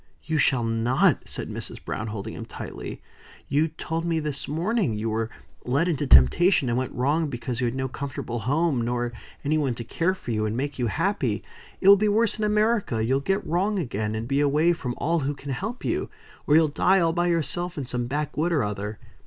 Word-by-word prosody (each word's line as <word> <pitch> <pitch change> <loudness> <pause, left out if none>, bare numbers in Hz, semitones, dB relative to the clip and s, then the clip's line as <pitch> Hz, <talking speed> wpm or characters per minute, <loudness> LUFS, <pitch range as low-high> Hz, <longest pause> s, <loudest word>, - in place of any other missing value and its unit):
"You 160 -1 -1
shall 130 -3 +3
not," 115 +3 +2
said - - -3
Mrs. - - -7
Browne, 110 - -3
holding 105 -2 -5
him - - -7
tightly. - - -7 0.4
"You 150 +3 +2
told 160 +1 -4
me 165 -1 0
this 150 -3 -3
morning 170 - 0
you 110 +1 -2
were 110 +1 -1 0.3
led 140 +7 +1
into 150 -4 0
temptation, 130 - +5
and 120 - +1
went 130 - -3
wrong 145 +5 +1
because 120 -1 -4
you - - +2
had 120 - -2
no 130 0 -1
comfortable 135 -2 -5
home, 140 +3 +1
nor 120 0 -1 0.3
any 155 +2 +1
one 135 -5 0
to 115 - -5
care 170 +10 0
for 125 - -6
you, 110 -1 0
and 110 +2 -2
make 140 +1 -3
you 120 - +1
happy. 120 - 0 0.4
It 190 - +1
will 200 0 +10
be 210 +2 +2
worse 220 +1 +2
in - - -1
America. 210 - +1
You'll 130 +3 +2
get 195 +8 -1
wrong 195 +5 0
again, 110 - -2
and 110 +1 -3
be 135 +2 +1
away 150 +4 +3
from 125 -7 -4
all 165 +3 +1
who 145 0 -2
can 140 0 -7
help 220 - -4
you. - - -1 0.4
Or 150 - +5
you'll 160 0 +6
die 185 +6 +3
all 165 -2 +2
by 175 0 +1
yourself, 175 +1 -1
in 140 - -3
some 120 -1 -2
backwood 150 +4 -1
or 150 -7 +2
other. 105 +1 -4
140 Hz, 215 wpm, -25 LUFS, 120-170 Hz, 0.4 s, will